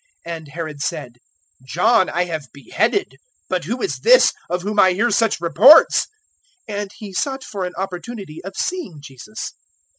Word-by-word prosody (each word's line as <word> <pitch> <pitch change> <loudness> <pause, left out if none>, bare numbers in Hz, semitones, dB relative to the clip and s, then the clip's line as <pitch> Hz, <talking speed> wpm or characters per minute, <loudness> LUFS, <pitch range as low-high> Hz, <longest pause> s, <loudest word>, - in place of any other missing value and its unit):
009:009 170 0 -4
And 160 -2 -13
Herod 155 -1 -7
said, 125 -4 -4 0.5
"John 185 - +2
I 175 +2 0
have 160 -5 -5
beheaded; 140 - -1 0.3
but 180 -3 -2
who 235 +8 -3
is 395 - -2
this, - - +5 0.2
of 180 0 -2
whom 210 +1 -1
I 185 -2 +6
hear 225 +6 +1
such 225 -1 +1
reports?" 225 - +6 0.6
And 205 -1 -4
he 205 -3 -9
sought 270 +6 -2
for 195 -6 -5
an 180 - -7
opportunity 190 -1 -6
of 195 +1 -8
seeing 350 - -3
Jesus. 135 -6 -9
185 Hz, 160 wpm, -20 LUFS, 160-225 Hz, 0.6 s, I